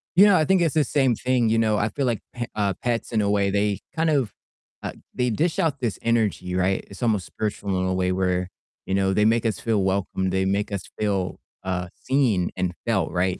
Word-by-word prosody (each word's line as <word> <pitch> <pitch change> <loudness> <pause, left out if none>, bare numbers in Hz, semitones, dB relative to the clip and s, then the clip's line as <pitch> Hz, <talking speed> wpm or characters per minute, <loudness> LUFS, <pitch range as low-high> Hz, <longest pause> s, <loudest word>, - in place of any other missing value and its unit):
You 195 +4 +8
know, 205 -2 +6
I 155 - +3
think 190 +2 +3
it's 165 -4 +2
the 155 - +3
same 135 -3 +2
thing, 125 -1 +1
you 115 +1 +3
know. 110 -2 +2
I 105 +2 +1
feel 140 +3 -2
like 120 -3 0
p 120 -1 -3
uh, 100 -2 +1
pets 120 -1 -1
in 110 -2 +2
a 100 - +1
way, 100 -1 +2
they 100 0 +1 0.2
kind 160 0 +2
of, 135 -9 +1 0.5
uh, - - -4 0.2
they 125 0 0
dish 160 +9 0
out 150 -4 +1
this 120 -5 -2
energy, 110 -6 0
right? 95 +1 +1
It's 100 +4 -8
almost 105 -6 +1
spiritual 105 -1 -4
in 95 - 0
a 95 - 0
way 90 0 +1
where, 90 -1 0 0.4
you 95 - -1
know, 95 0 +2
they 105 +2 +3
make 115 +1 +3
us 110 - 0
feel 110 -4 +1
welcome, 95 0 0
they 95 +1 +1
make 100 +2 0
us 100 -3 -3 0.2
feel, 100 -4 -1 0.2
uh, 90 -1 -2
seen 120 -10 +1
and 90 -1 -1
felt, 115 -5 +1
right? 90 +1 0
105 Hz, 235 wpm, -24 LUFS, 95-120 Hz, 0.5 s, You